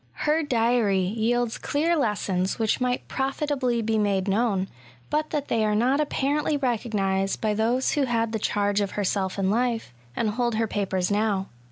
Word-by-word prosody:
Her 305 +2 +3
diary 235 -7 +2 0.2
yields 235 +1 0
clear 325 +4 +1
lessons 200 - 0
which 225 +1 0
might 250 0 -1
profitably 265 -3 -1
be 220 0 +1
made 200 -2 +1
known, 200 -2 +1 0.4
but 305 +1 0
that 290 -1 -2
they 225 -1 +1
are 210 -1 +1
not 255 +6 +2
apparently 295 +1 0
recognised 205 -7 0
by 215 -1 0
those 235 +5 +1
who 290 -2 +1
had, 230 -2 0
the 220 - -2
charge 205 0 +1
of 200 - -2
herself 195 -1 -1
in 195 -1 +1
life, 230 - -1 0.2
and 220 -2 0
hold 240 +1 0
her 225 +1 +1
papers 195 -3 -1
now. 205 -2 0
225 Hz, 170 wpm, -25 LUFS, 205-250 Hz, 0.4 s, Her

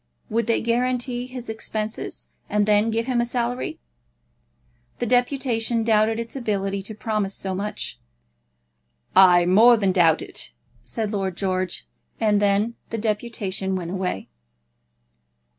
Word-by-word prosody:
Would 230 0 +1
they 230 - +2
guarantee 245 +1 0
his 250 -1 -8
expenses, 220 -1 -4 0.2
and 210 0 +2
then 210 +1 +3
give 225 +1 0
him 250 -2 +1
a - - +2
salary? 245 +1 -2 1.2
The - - -1
deputation 245 -2 +1
doubted 220 0 +3
its 230 +2 -6
ability 200 -5 -1
to 210 +3 -8
promise 210 -2 -2
so 190 -1 -3
much. 205 +3 -4 1.2
"I 180 -2 +7
more 225 +7 +7
than 200 -3 +2
doubt 165 -4 +4
it," - - -6 0.3
said 220 -3 -3
Lord 190 -4 -2
George; 185 - -1 0.3
and 210 -2 +3
then 205 +3 +2 0.2
the 225 - -3
deputation 210 -3 -2
went 175 -2 -4
away. 185 - -3
215 Hz, 130 wpm, -23 LUFS, 195-235 Hz, 1.2 s, I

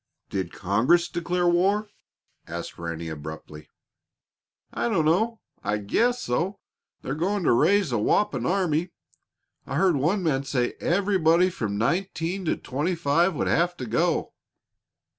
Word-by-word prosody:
"Did 95 -3 -2
Congress 125 - +2
declare 175 +1 -1
war?" 195 +5 +2 0.6
asked 85 +1 -6
Ranny, 85 -1 -5
abruptly. 75 0 -8 1.0
"I - - -1
dunno; 200 +5 +1 0.2
I 105 - 0
guess 240 - +1
so. 175 +11 -1 0.5
They're 135 - -3
going 185 +6 -1
to - - +3
raise 195 +6 +3
a 120 - +1
whopping 125 - +1
army. 175 -2 +1 0.8
I - - -4
heard 180 -6 +3
one 175 +8 +1
man 140 -5 +1
say 125 -3 -1
everybody 180 -2 +3
from 105 - -3
nineteen 175 - -1
to - - 0
twenty 150 +8 -2
five 170 +3 +2
would - - -1
have 175 +1 +1
to 125 - -5
go." 160 +9 0
165 Hz, 135 wpm, -25 LUFS, 120-185 Hz, 1.0 s, to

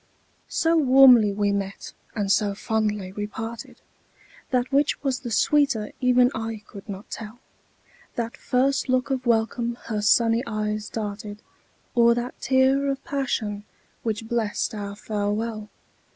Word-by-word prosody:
So 330 0 +2
warmly 255 -6 +7
we 205 0 0
met 195 -1 -4 0.2
and 205 -3 0
so 205 -1 +2
fondly 210 -3 -1
we 205 +1 -4
parted, 225 +2 -7 0.7
That 255 -1 0
which 285 +2 +1
was 265 -3 0
the 240 - -6
sweeter 235 -2 +2
even 250 0 +4
I 225 -1 -5
could 200 0 -12
not 200 +1 -8
tell, 220 +1 -7 0.8
That 230 -1 -3
first 270 +2 0
look 255 0 +1
of 255 -2 -2
welcome 235 +1 +1
her 215 -2 -3
sunny 230 +2 +4
eyes 215 -1 -2
darted, 210 -1 -6 0.5
Or 235 -1 +5
that 240 +1 -5
tear 265 +1 +3
of 275 0 -2
passion, 220 -7 -2 0.4
which 220 -1 -3
blest 225 -3 -1
our 200 -1 -5
farewell. 210 +1 -3
225 Hz, 135 wpm, -24 LUFS, 210-250 Hz, 0.8 s, warmly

